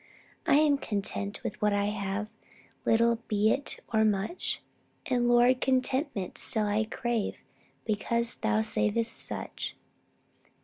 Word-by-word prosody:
I - - +5
am 295 -1 +4
content 200 -2 -3
with - - -5
what 210 -1 +2
I 200 0 +1
have, 205 0 -2 0.6
Little 230 0 +3
be 215 0 +2
it 280 - -1
or 220 0 +4
much: 210 - -1 0.4
And, 240 -1 +1
Lord, 245 +1 +4
contentment 260 - 0
still 220 -2 +4
I 210 +1 +1
crave, 230 0 -2 0.5
Because 235 +2 0
thou 220 -1 +1
savest 220 +1 +1
such. - - -4
220 Hz, 125 wpm, -29 LUFS, 210-240 Hz, 0.6 s, I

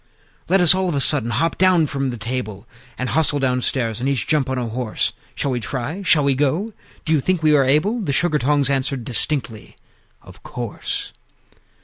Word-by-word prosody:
Let 190 +1 +3
us 175 -1 +8
all 190 -1 -1
of 160 - -2
a - - 0
sudden 135 -4 +2
hop 125 +9 -1
down 185 -3 +4
from 135 -2 -3
the 120 - -5
table, 115 -3 -5 0.3
And 130 - -3
hustle 155 -2 +2
downstairs, 125 -3 -1
and 130 +3 -1
each 135 -5 -1
jump 150 -4 0
on 130 - -2
a 125 - -2
horse! 115 0 -2 0.2
Shall 140 - -1
we 125 - -1
try? 135 - -4
Shall 160 -5 +3
we 140 -1 +2
go? 155 - -1 0.3
Do 160 - +1
you 155 - +3
think 175 +3 -1
we 155 -1 +4
are 140 - +4
able?" 160 - +1
The 175 - -2
Sugar 155 +2 +2
tongs 140 +1 +1
answered 135 -1 -1
distinctly, 120 -2 0 0.5
"Of - - -16
course!" - - -5
140 Hz, 200 wpm, -20 LUFS, 125-155 Hz, 0.5 s, us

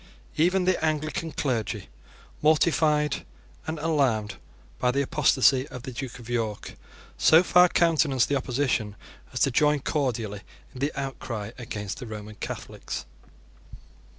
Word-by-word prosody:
Even 180 +3 +2
the 185 -3 +1
Anglican 155 +1 -1
clergy, 110 -8 -2 0.5
mortified 150 -1 +3 0.4
and 160 0 -2
alarmed 140 -9 0 0.4
by 125 - +2
the 140 +3 +1
apostasy 130 0 +3
of 125 - -9
the 130 - -6
Duke 130 0 -6
of 120 -2 -12
York, 115 -4 -3 0.5
so 160 +3 +6
far 180 0 +6
countenanced 155 -8 +3
the 140 - 0
opposition 125 -5 -1 0.4
as - - -4
to 135 - +4
join 150 +3 +3
cordially 120 -8 -2 0.3
in 130 - -10
the 140 +3 0
outcry 120 -6 -5
against 105 -5 -5
the 125 - -7
Roman 110 -1 -7
Catholics. - - -6
135 Hz, 130 wpm, -26 LUFS, 115-155 Hz, 0.5 s, so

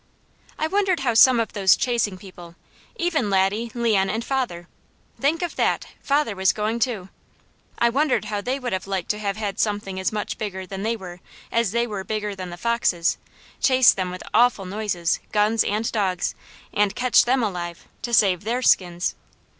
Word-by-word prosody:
I 310 - 0
wondered 375 -1 +1
how 245 -3 +1
some 240 +2 +7
of 230 - -2
those 195 -3 +5
chasing 230 -6 0
people, 175 -3 -12 0.4
even 340 - 0
Laddie, 200 +4 +1
Leon, 215 -5 +2
and 225 +2 -2
father 240 -11 -2 0.5
think 315 +5 +1
of 345 - -3
that! - - +1 0.2
father 280 -6 +1
was 190 0 +2
going 215 +2 -2
too 220 -7 -1 0.7
I 235 - +3
wondered 280 -2 +1
how 205 -1 -3
they 255 +5 -2
would 250 -5 -3
have 190 +1 -3
liked 190 -3 -1
to 210 - -5
have 200 -1 -2
had 205 -3 -4
something 205 -3 -1
as 190 - 0
much 210 -1 -4
bigger 190 -3 -4
than 195 +1 -6
they 225 +3 0
were, 180 -3 -9 0.3
as 230 -3 +2
they 235 +4 +1
were 205 -4 -5
bigger 210 +1 -3
than 185 -1 -6
the 175 - -8
foxes, 200 -6 +1 0.4
chase 260 -2 +6
them 185 -2 -3
with 180 0 -7
awful 235 -4 +3
noises, 185 -3 -1
guns 215 +1 +3
and 215 +3 -1
dogs, 190 -5 0 0.4
and 205 0 +1
catch 250 -1 +4
them 255 0 +2
alive 175 -4 -4
to 240 - -4
save 195 -6 +3
their 240 +4 -1
skins. 175 -4 +2
210 Hz, 185 wpm, -23 LUFS, 190-235 Hz, 0.7 s, some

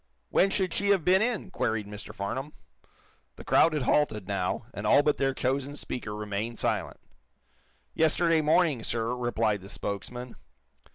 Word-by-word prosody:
"When 195 - +4
should 190 -2 -1
she 200 - -1
have 195 -5 +3
been 185 +2 +5
in!" 220 -4 -1
queried 110 - -1
Mr. 105 +1 -8
Farnum. 130 +9 -4 0.8
The - - -11
crowd 165 - +4
had 150 -4 0
halted, 110 -10 +1
now, 100 0 -2
and 105 +1 -4
all 145 - +6
but 150 - +2
their 135 -1 0
chosen 135 +3 -1
speaker 110 -7 -5
remained 105 +2 -4
silent. - - -1 0.9
"Yesterday 160 +1 +3
morning, 155 -4 +3
sir," 115 +2 -1
replied 115 -4 0
the 95 - -11
spokesman. 120 +6 -5
125 Hz, 155 wpm, -28 LUFS, 105-155 Hz, 0.9 s, all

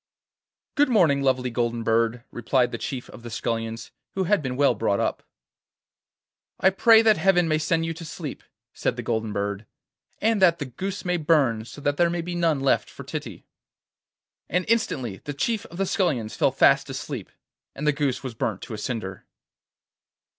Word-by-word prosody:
'Good 290 -1 +3
morning, 165 - +4
lovely 130 -2 +1
golden 120 -1 -1
bird,' 115 +1 +1
replied 120 +1 +1
the - - -4
chief 130 -2 -5
of - - -12
the 120 - -8
scullions, 115 0 -3 0.2
who 190 - +1
had 200 +1 +2
been 130 -3 -3
well 140 +1 +4
brought 100 -3 0
up. - - -1 1.4
'I 190 - +5
pray 225 +3 +6
that 220 -1 +5
Heaven 175 0 +3
may 155 -1 +2
send 165 +1 +1
you 165 - -2
to 165 +1 -9
sleep,' 155 -2 -7 0.3
said - - -1
the - - -5
golden 110 -2 -1
bird, 100 +1 -3 0.5
'and 220 -1 +1
that 170 -3 +5
the 145 - -4
goose 190 +11 -5
may 180 0 +1
burn, 145 -9 +2
so 120 +5 -11
that 145 0 0
there 170 -1 +4
may 170 0 -2
be 175 +1 -5
none 165 -5 +1
left 135 - +2
for - - -10
Titty.' - - -7 1.0
And 180 +2 0
instantly 130 - 0
the 145 - -5
chief 220 +8 -1
of 170 - -11
the 195 - +1
scullions 140 - 0
fell - - +2
fast - - +4
asleep, - - -5 0.5
and 150 - -5
the 150 - +4
goose 140 -3 -1
was 130 -3 -5
burnt 110 -3 -3
to - - -7
a 105 - -5
cinder. 105 -5 -5
145 Hz, 185 wpm, -25 LUFS, 115-175 Hz, 1.4 s, pray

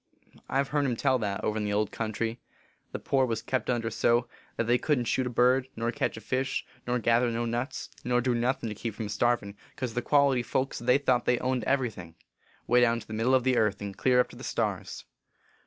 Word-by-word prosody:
I 135 +1 +2
ve 140 - -11
hearn 145 -2 +1
em 125 - 0
tell 130 +1 +2
that, 105 -1 -3
over 110 - 0
in - - -2
the 105 0 -1
old 105 0 0
country, 115 +1 -3 0.5
the - - -3
poor 135 -1 +1
was 115 -2 -2
kept 130 - -2
under 115 -2 0
so, 120 +2 +2 0.3
that - - +1
they 120 +2 +2
couldn 140 -2 +1
t 115 - -3
shoot 130 -1 +1
a - - -2
bird, 125 +2 +3
nor 115 +1 -1
ketch 115 - -2
a - - -8
fish, 130 +2 -2 0.2
nor 125 0 +1
gather 120 +1 +2
no 120 0 -1
nuts, 120 +4 -3
nor 125 0 +2
do 125 0 +1
nothin 120 0 0
to - - -4
keep 110 0 -5
from 110 -2 -4
starvin, 105 -1 0 0.2
cause 125 -3 -4
the 120 - -1
quality 140 -3 +3
folks 130 +2 -2
they 125 +2 +3
thought 130 -4 +1
they 125 - +3
owned 130 0 -1
every 130 -3 +1
thing, 85 -5 -11 0.5
way 125 0 +4
down 115 -1 +3
to - - -12
the 110 - -9
middle 115 +4 +2
of 130 - +2
the 130 -1 +2
earth 105 -2 +2
and 100 -1 -6
clear 125 -1 +3
up 125 - +2
to - - -13
the - - -10
stars. - - -3
120 Hz, 240 wpm, -28 LUFS, 115-130 Hz, 0.5 s, way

